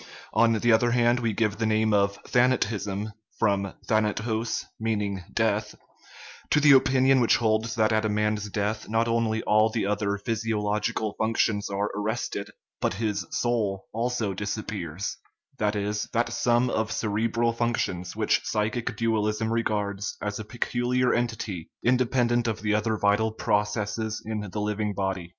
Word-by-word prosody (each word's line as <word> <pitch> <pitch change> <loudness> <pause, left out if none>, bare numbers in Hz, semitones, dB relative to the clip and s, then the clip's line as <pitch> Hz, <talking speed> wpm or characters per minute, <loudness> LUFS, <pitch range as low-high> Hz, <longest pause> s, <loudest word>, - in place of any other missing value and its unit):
On 115 -1 +4
the 120 +2 +2
other 115 +2 +4
hand, 120 0 +3
we 115 -2 0
give 105 -1 0
the 115 - 0
name 110 0 +2
of 100 -1 +2
"thanatism" 105 -4 +1 0.2
(from 100 -3 +1
thanatos 110 +1 0 0.3
= 100 -3 -4
death) 110 -1 0 0.7
to - - +4
the 150 -1 +6
opinion 130 0 +5
which 120 - +4
holds 110 -1 0
that 110 -2 +2
at 110 0 +2
a 110 - 0
man's 105 0 0
death 105 +2 -2
not 115 +1 +1
only 115 -1 0
all 110 +1 +4
the 110 -2 -1
other 105 0 0
physiologi 105 0 -1
cal 110 -2 -2
functions 110 -2 +1
are 100 +1 -1
arrested, 105 -1 -3 0.3
but - - 0
his 105 -1 -2
" - - -32
soul 105 -5 -1
" - - -52
also 115 -2 -1
disap 105 +2 -4
pears 90 -2 -4 0.4
that 105 0 +1
is, 105 0 -2
that 120 0 0
sum 120 +1 +2
of 110 0 -1
cerebral 115 +2 0
functions 115 -7 -2
which - - +2
psychic 110 +2 -2
dualism 110 0 0
regards 105 -3 -1
as 105 0 -3
a - - -4
peculiar 120 +2 0
entity, 110 -7 -2
inde 125 0 +3
pendent 120 -2 +2
of 110 -1 -3
the 105 0 +1
other 110 +1 +1
vital 105 +2 +2
processes 105 +1 -1
in 110 -1 -3
the 105 - -4
living 105 0 -1
body. 95 -3 -2
110 Hz, 160 wpm, -26 LUFS, 105-115 Hz, 0.7 s, the